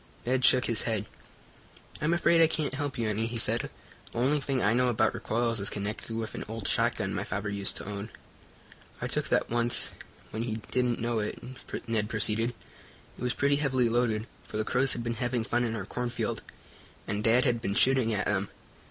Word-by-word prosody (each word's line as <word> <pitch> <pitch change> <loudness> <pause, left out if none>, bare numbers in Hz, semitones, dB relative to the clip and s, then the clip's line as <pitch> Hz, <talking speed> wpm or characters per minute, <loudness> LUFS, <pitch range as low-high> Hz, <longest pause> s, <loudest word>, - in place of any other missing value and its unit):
Ned 130 +1 +1
shook 125 0 +5
his 115 - +3
head. 105 -2 0 1.0
"I'm 150 +2 +1
afraid 170 -1 +4
I 165 - +7
can't 155 -4 0
help 140 -1 -3
you 115 -2 0
any," 110 +2 0
he 115 0 -3
said. 115 +1 +2 0.4
"The - - -8
only 135 +5 +2
thing 135 -1 -1
I 105 -2 +3
know 125 +1 +3
about 110 -2 +2
recoils 115 0 +1
is 100 - +4
connected 105 +2 -4
with 110 -1 -3
an - - -5
old 110 -2 -5
shotgun - - +1
my - - -2
father 100 +2 -3
used 100 -1 0
to - - -2
own. 100 +2 -5 0.9
"I - - -3
took - - 0
that - - +1
once, 120 0 +2 0.4
when 110 - -3
he 115 -2 -2 0.2
didn't 125 -2 +1
know 115 -1 0
it," 105 - -3 0.5
Ned 110 -2 0
proceeded. 110 +2 +1 0.6
"It - - -14
was 125 -1 -1
pretty 140 0 +2
heavily 130 -4 +2
loaded, 115 -2 +1 0.2
for - - -5
the 110 - 0
crows 130 +1 +2
had 120 - -4
been 120 0 -1
having 120 -1 0
fun 120 +2 0
in 115 -2 -1
our 100 -4 -4
cornfield, 120 +3 -3 0.7
and 105 +1 -2
dad 120 +3 +4
had 120 -2 +1
been 100 -3 -2
shooting 130 -2 +4
at 105 -2 0
them. 100 -1 0
115 Hz, 205 wpm, -29 LUFS, 110-125 Hz, 1.0 s, I